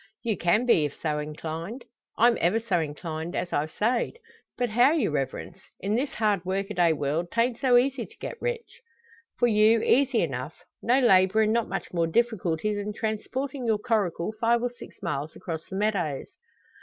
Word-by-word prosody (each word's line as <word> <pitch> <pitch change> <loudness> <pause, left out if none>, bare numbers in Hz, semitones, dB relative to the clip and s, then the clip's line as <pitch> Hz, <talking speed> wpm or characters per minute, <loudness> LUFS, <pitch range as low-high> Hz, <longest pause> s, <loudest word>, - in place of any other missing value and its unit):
"You 225 -3 0
can 185 +8 +2
be, 230 -10 +4
if 145 - -6
so 150 -1 -1
inclined." 160 - -6 0.3
"I'm 235 +1 +5
ever 180 +7 +3
so 215 -6 0
inclined, 160 +2 -4
as 175 - -3
I've 150 +2 0
sayed. 235 - 0 0.4
But 245 -2 -1
how, 245 +6 +5
your 270 - +1
Reverence? 145 +5 -3 0.2
In 200 +2 -2
this 260 +5 -1
hard 210 -5 +1
work 190 +2 -1
o' - - -2
day 175 -3 +3
world 155 +3 -1
'tant 235 +1 +1
so 255 -3 +5
easy 255 -1 +1
to - - -21
get 475 - -7
rich." 485 -1 -4 0.6
"For 245 - +3
you, 220 0 +4
easy 260 -2 +3
enough. 135 -1 -4 0.3
No 250 +3 +3
labour 190 -3 +5
and 215 0 +2
not 235 -1 0
much 195 - -4
more 170 -2 +1
difficulty 210 -2 0
than 205 0 -3
transporting 250 +5 -3
your 220 -2 +3
coracle 210 -4 -1
five 235 +1 +3
or 245 - 0
six 245 - -13
miles 145 +2 -3
across 165 -3 -6
the 190 - -6
meadows." 190 -9 -1
210 Hz, 185 wpm, -26 LUFS, 165-235 Hz, 0.6 s, I'm